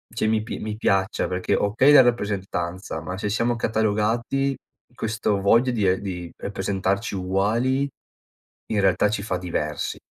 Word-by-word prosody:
cioè 115 - 0
mi 110 0 +2
p - - -5
mi 105 -1 -4
piaccia 95 -3 +1
perché, 90 0 -1
okay 115 +8 +3
la 145 - +10
rappresentanza, 95 -7 -2
ma 90 +5 -5
se 105 - -2
siamo 115 +3 +1
catalogati 115 +5 0 0.4
questo 110 -3 -1
voglia 115 +6 +4
di 105 -4 0
e 95 +1 +2
di 90 -4 -5
rappresentarci 100 +1 -2
uguali, 110 +9 +1 0.8
in 105 - +1
realtà 95 +1 +3
ci 105 -1 -2
fa 95 -4 -2
diversi. 75 -4 -3
105 Hz, 150 wpm, -24 LUFS, 95-115 Hz, 0.8 s, la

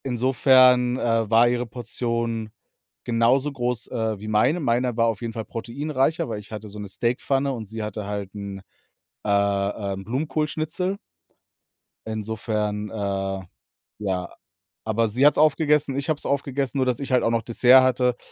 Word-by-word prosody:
Insofern, 125 0 +4
äh, 115 -3 0
war 115 +2 +5
ihre 120 0 0
Portion 115 -1 -3 0.5
genauso 125 +4 +2
groß, 125 -3 -3
äh, 110 -4 -2
wie 105 - -8
meine. 110 +11 +2
Meiner 125 -3 0
war 115 - +4
auf 110 -3 -2
jeden 115 -1 -4
Fall 110 -1 -5
proteinreicher, 140 - -1
weil 105 - -4
ich 105 - -14
hatte 105 -1 -7
so 105 +1 -9
'ne 105 - -6
Steakpfanne 135 +6 0
und 115 -3 -6
sie 110 +2 -6
hatte 105 0 -5
halt 100 -2 -5
'n, 100 -1 -7 0.6
äh, - - -4 0.6
ähm, 95 0 -6
Blumenkohlschnitzel. 155 - -2 1.1
Insofern, 105 -1 -3
äh, 95 -2 -3 0.6
ja 95 -3 -2 0.6
aber 110 +1 +1
sie 125 +6 +2
hat's 150 - +5
aufgegessen, 150 -2 +3
ich 140 +3 -2
habe 155 - +1
es - - -12
aufgegessen, 140 -1 -1
nur 130 - +2
dass 125 -2 0
ich 140 -2 -4
halt 125 - +4
auch - - +2
noch 115 -1 +1
Dessert 125 +3 +5
hatte. 125 -1 +2
120 Hz, 160 wpm, -24 LUFS, 110-130 Hz, 1.1 s, war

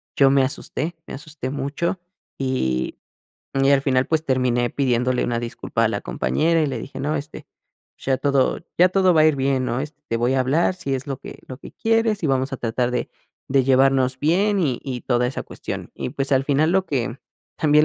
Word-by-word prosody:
yo 135 -1 +5
me 135 -1 +4
asusté, 155 +5 -3
me - - -8
asusté 145 -2 -6
mucho, 145 +6 -2 0.4
y 65 - -1 0.6
y 135 0 +3
al 140 -1 +5
final 130 -2 +2
pues, 160 -1 0
terminé 125 -2 +1
pidiéndole 125 -2 +1
una 120 -1 -1
disculpa 120 -1 -2
a - - +3
la - - -2
compañera, 165 +1 +1
y - - +2
le 135 - -3
dije: 135 -1 -7
"No, 150 +3 -1
este, 145 +1 -7 0.5
ya 130 -1 0
todo 140 -2 +1 0.2
ya 180 +1 +7
todo 185 -1 +4
va 155 - +5
a - - +6
ir 155 -3 +3
bien, 135 -1 +1
¿no?, 120 +2 -1
este, 150 +2 -7
te 115 - 0
voy 120 +2 +1
a 135 - +2
hablar 150 +8 +2
si 140 -7 -3
es 135 +2 -4
lo 135 -2 -4
que - - -10
lo 130 - -8
que - - -12
quieres, 225 -2 +1
y - - +1
vamos 130 0 0
a 135 - -2
tratar 120 +1 -1
de 125 - -1 0.4
de 135 -1 +3
llevarnos 130 0 +3
bien, 195 +7 +2
y 135 -8 0
y 130 -3 -5
toda 125 -1 +1
esa 125 - -3
cuestión", - - -6
y, - - -4
pues, 140 +1 -1
al 135 0 +3
final 150 +4 +2
lo 190 0 +2
que 125 -2 -2 0.4
también, 150 0 +4
135 Hz, 215 wpm, -22 LUFS, 130-155 Hz, 0.6 s, ya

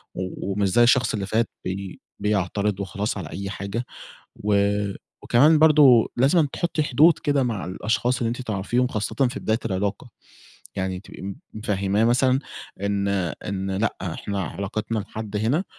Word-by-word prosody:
و 95 +1 -4
ومش 100 0 +1
زي 120 +6 +4
الشخص 125 +1 +4
اللي 100 -3 -2
فات 110 +3 0 0.2
بي 95 0 -5 0.2
بيعترض 100 0 0
وخلاص 100 +2 -3
على 85 -5 -6
أي 100 +3 -5
حاجة، 100 +5 -4 0.6
و 105 0 +2 0.7
و - - -11
كمان 150 +6 +5
برضه 150 -7 +6
لازمًا 145 +5 +3
تحُطّي 170 -2 -1
حدود 150 +4 +4
كده 145 -2 +1
مع 115 -6 -2
الأشخاص 115 +6 -1
اللي 115 - 0
أنتِ 120 +3 -3
تعرفيهم 115 +3 0
خاصةً 110 -5 -3 0.2
في 135 - -6
بداية 110 +1 0
العلاقة، 100 +6 -2 0.7
يعني 95 -1 -2
تبقي - - -12
م 100 0 -5 0.2
مفهِّماه 105 -1 0
مثلًا 130 +2 +3 0.4
إن 100 0 0 0.4
إن 95 0 -3
لأ، 100 +4 -1
إحنا 95 +2 -3
علاقتنا 105 +6 -3
لحد 105 0 -5
هنا 120 - +1
105 Hz, 155 wpm, -24 LUFS, 100-125 Hz, 0.7 s, برضه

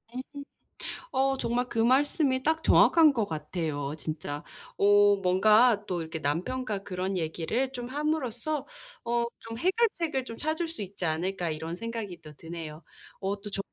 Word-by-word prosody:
음. 255 - -2 0.9
어 270 +1 +2
정말 245 0 -1
그 230 - -4
말씀이 260 +2 +3
딱 320 +3 +1
정확한 320 -3 +6
것 225 -5 0
같아요 155 -3 -3
진짜. 150 -1 -5 0.3
어 205 0 +6
뭔가 210 +4 +4
또 180 -2 -2
이렇게 160 0 -5
남편과 195 - -1
그런 185 0 -3
얘기를 175 +10 -1
좀 245 -2 -5
함으로써 295 -1 -1 0.4
어 235 0 +1
좀 225 0 -7
'해결책을 345 - +1
좀 230 -2 -8
찾을 315 +2 -1
수 325 -10 -5
있지 195 -1 -6
않을까.' 170 +2 -1
이런 160 +2 -4
생각이 225 -4 -5
또 155 -1 -11
드네요. 165 -1 -8 0.4
어 200 +1 -2
또 205 0 -7
저 195 - -5
210 Hz, 285 characters per minute, -28 LUFS, 170-260 Hz, 0.9 s, 정확한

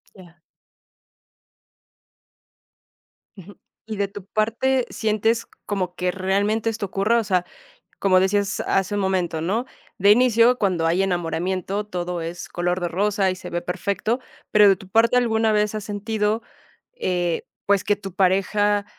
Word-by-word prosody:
Ya. 175 -3 -16 3.0
Ujú. 195 +2 -13 0.3
Y 220 -1 -5
de 200 0 0
tu 195 -1 -10
parte, 235 +5 0
¿sientes 220 +1 0 0.2
como 185 -3 -2
que 180 0 -1
realmente 200 +4 0
esto 220 -2 -3
ocurra? 200 +5 +1
O 230 - -1
sea, 185 -3 0 0.5
como 185 -2 +4
decías 195 +1 +1
hace 195 +2 +1
un 205 - 0
momento, 185 -4 0
¿no? 215 +9 -1 0.3
De 200 +2 +5
inicio, 245 +1 +5
cuando 185 -6 0
hay 170 +3 +2
enamoramiento, 185 +3 -2
todo 180 -3 -4
es 170 +2 -6
color 175 +1 -1
de 175 - -1
rosa 195 +1 +1
y - - -4
se 185 - -9
ve 175 0 -2
perfecto. 200 +6 -2 0.3
Pero 210 -1 +7
de 195 - +6
tu 190 +1 -15
parte, 230 +4 +3
¿alguna 225 -2 +2
vez 210 0 +1
has 215 - -4
sentido, 210 +1 -1 0.5
eh, 175 - -1 0.2
pues, 200 -1 +2
que 205 - +2
tu 195 -2 -9
pareja 200 +2 +2
200 Hz, 150 wpm, -23 LUFS, 185-215 Hz, 3.0 s, Pero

